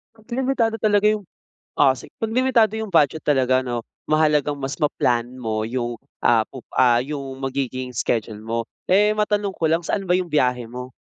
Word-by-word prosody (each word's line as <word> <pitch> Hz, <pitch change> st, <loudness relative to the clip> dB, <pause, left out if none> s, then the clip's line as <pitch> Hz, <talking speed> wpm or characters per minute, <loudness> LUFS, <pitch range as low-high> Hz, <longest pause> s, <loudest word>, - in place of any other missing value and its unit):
'Pag 220 Hz, -1 st, -22 dB
limitado 255 Hz, -4 st, +1 dB
talaga 210 Hz, -2 st, +3 dB
'yong 215 Hz, -1 st, +1 dB, 0.6 s
o, -, -, +6 dB
si -, -, -12 dB
'Pag 225 Hz, 0 st, -3 dB
limitado 245 Hz, -4 st, +3 dB
'yong 220 Hz, -1 st, -4 dB
budget 160 Hz, -2 st, +3 dB
talaga, 130 Hz, -3 st, +2 dB
'no, 120 Hz, -2 st, -4 dB, 0.2 s
mahalagang 150 Hz, -2 st, +2 dB
mas 135 Hz, 0 st, -3 dB
ma-plan 125 Hz, -5 st, +2 dB, 0.2 s
mo 110 Hz, -3 st, -2 dB
'yong, 120 Hz, +1 st, -2 dB, 0.3 s
ah, 115 Hz, -2 st, +4 dB
pup 130 Hz, -2 st, -11 dB
ah, 120 Hz, -2 st, +5 dB
'yong 135 Hz, 0 st, -5 dB
magiging 130 Hz, -1 st, -3 dB
schedule 110 Hz, -2 st, -2 dB
mo. 115 Hz, +1 st, -2 dB, 0.3 s
Eh, 210 Hz, +3 st, +4 dB
matanong 210 Hz, -2 st, 0 dB
ko -, -, -4 dB
lang, 165 Hz, +2 st, +2 dB
saan 200 Hz, -, -1 dB
ba 180 Hz, 0 st, +3 dB
'yong 180 Hz, -2 st, -4 dB
biyahe 125 Hz, -5 st, +1 dB
mo? 125 Hz, +2 st, -8 dB
145 Hz, 180 wpm, -22 LUFS, 125-205 Hz, 0.6 s, o